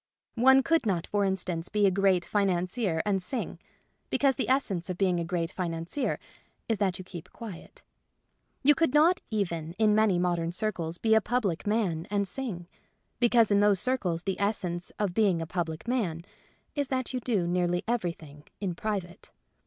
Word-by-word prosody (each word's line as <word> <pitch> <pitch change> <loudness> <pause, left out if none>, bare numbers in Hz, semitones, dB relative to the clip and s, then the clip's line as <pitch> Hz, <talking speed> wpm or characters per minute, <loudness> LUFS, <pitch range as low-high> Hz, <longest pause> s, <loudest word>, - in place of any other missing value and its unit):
One 265 +1 +7
could 330 -6 +2
not, 175 -4 0
for 205 -1 0
instance, 180 -3 -2
be 210 -1 +2
a 195 - +5
great 190 -2 +2
financier 185 -2 0
and 195 -2 +1
sing; 245 +7 -4 0.5
because 275 -2 +2
the 265 - -2
essence 195 -10 +1
of 180 - -3
being 185 -3 +2
a - - -1
great 170 0 -2
financier 175 - -2 0.5
is 225 -3 0
that 190 -3 +1
you 185 - -7
keep 175 -1 -10
quiet. 215 -8 -10 0.8
You 295 +2 +7
could 320 -2 +1
not 330 +5 +5
even 170 -7 -2
in 210 +2 +3
many 215 -4 +3
modern 175 -1 0
circles 175 -5 -2
be 220 +4 +2
a 220 - +5
public 210 -7 -1
man 195 -7 0
and 200 -1 0
sing; 190 -6 -5 0.5
because 235 -3 +4
in 200 - +5
those 205 -2 +4
circles 185 -10 0
the 195 -1 -2
essence 185 -4 -1
of 205 -4 -1
be 215 +2 +3
ing 180 -4 +1
a 165 - -3
public 160 +1 -4
man 180 -10 -1 0.5
is 285 -2 -1
that 260 -1 -2
you 255 - -1
do 220 -7 0
nearly 175 0 0
everything 165 -10 -3
in 195 -4 -2
private. 190 0 -4
195 Hz, 175 wpm, -28 LUFS, 175-225 Hz, 0.8 s, One